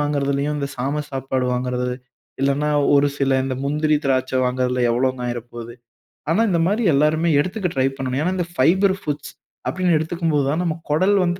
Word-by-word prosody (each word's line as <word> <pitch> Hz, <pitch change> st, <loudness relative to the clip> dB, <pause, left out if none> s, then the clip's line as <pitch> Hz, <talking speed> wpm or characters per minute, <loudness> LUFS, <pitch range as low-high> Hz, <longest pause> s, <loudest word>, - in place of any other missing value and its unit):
வாங்குறதிலேயும், 145 Hz, 0 st, 0 dB
இந்த 140 Hz, -1 st, -2 dB
சாம 140 Hz, +4 st, -2 dB
சாப்பாடு 130 Hz, -1 st, -2 dB
வாங்குறது, 125 Hz, 0 st, -2 dB, 0.5 s
இல்லன்னா, 140 Hz, +2 st, +1 dB, 0.3 s
ஒரு 140 Hz, 0 st, +5 dB
சில 135 Hz, -1 st, +2 dB
இந்த 135 Hz, -1 st, -2 dB
முந்திரி, 150 Hz, +2 st, +1 dB
திராட்ச 130 Hz, -1 st, 0 dB
வாங்குறதுல 125 Hz, 0 st, 0 dB
எவ்ளோங்க 130 Hz, +2 st, 0 dB
ஆயிறப்போது. 120 Hz, -1 st, -6 dB, 0.6 s
ஆனா, 170 Hz, +7 st, +3 dB
இந்தமாரி 185 Hz, +6 st, +1 dB
எல்லாருமே 155 Hz, +4 st, +2 dB
எடுத்துக்க 185 Hz, +3 st, -2 dB
ட்ரைப் 135 Hz, +1 st, 0 dB
பண்ணணும். 130 Hz, 0 st, -2 dB
ஏனா, 180 Hz, -, 0 dB
இந்த 175 Hz, -, -1 dB
ஃபைபர் 190 Hz, +8 st, +3 dB
ஃபுட்ஸ் 145 Hz, -1 st, -4 dB, 0.4 s
அப்பிடின்னு 180 Hz, -3 st, +2 dB
எடுத்துக்கும்போதுதான், 160 Hz, -2 st, 0 dB
நம்ம 165 Hz, -3 st, -1 dB
குடல் 185 Hz, +7 st, +3 dB
வந்து 175 Hz, +1 st, -1 dB
140 Hz, 155 wpm, -21 LUFS, 130-165 Hz, 0.6 s, ஒரு